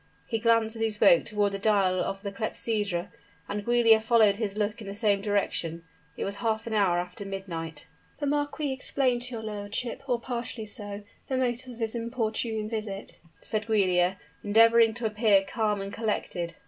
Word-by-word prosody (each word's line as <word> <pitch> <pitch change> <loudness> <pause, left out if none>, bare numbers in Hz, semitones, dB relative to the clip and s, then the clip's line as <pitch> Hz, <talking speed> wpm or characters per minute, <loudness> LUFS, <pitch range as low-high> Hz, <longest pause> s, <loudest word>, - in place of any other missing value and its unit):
He 225 - -2
glanced 230 0 +2
as 225 - -6
he 225 - +2
spoke 210 -5 +5
toward 205 -1 +1
the 195 - -4
dial 195 -3 +3
of 195 +2 -3
the 200 - -3
clepsydra, 205 -3 -2 0.4
and 205 0 -3
Giulia 235 -1 +5
followed 220 -2 +4
his 210 -2 -3
look 210 +2 -1
in 205 - -8
the 200 - -5
same 205 -2 +2
direction; 185 -5 -1 0.3
it - - -2
was 200 +1 -4
half 225 0 -1
an 230 - -4
hour 195 -5 +3
after 180 +3 -4
midnight. 170 -6 -6 0.3
"The 290 - -3
marquis 290 0 -1
explained 260 -2 +1
to 250 0 -4
your 220 - -6
lordship, 210 +3 -4
or 245 -1 +2
partially 235 -2 -4
so, 205 -1 -7 0.3
the 260 - 0
motive 250 0 -1
of 235 - -14
his 225 -1 -1
importunate 225 -2 -2
visit," 215 -3 -5 0.2
said 215 -1 -3
Giulia, 185 -4 +2 0.3
endeavoring 225 +1 +5
to 235 - -3
appear 210 -2 +4
calm 210 0 -1
and 195 0 -6
collected. 180 -6 -2
215 Hz, 180 wpm, -28 LUFS, 200-230 Hz, 0.4 s, spoke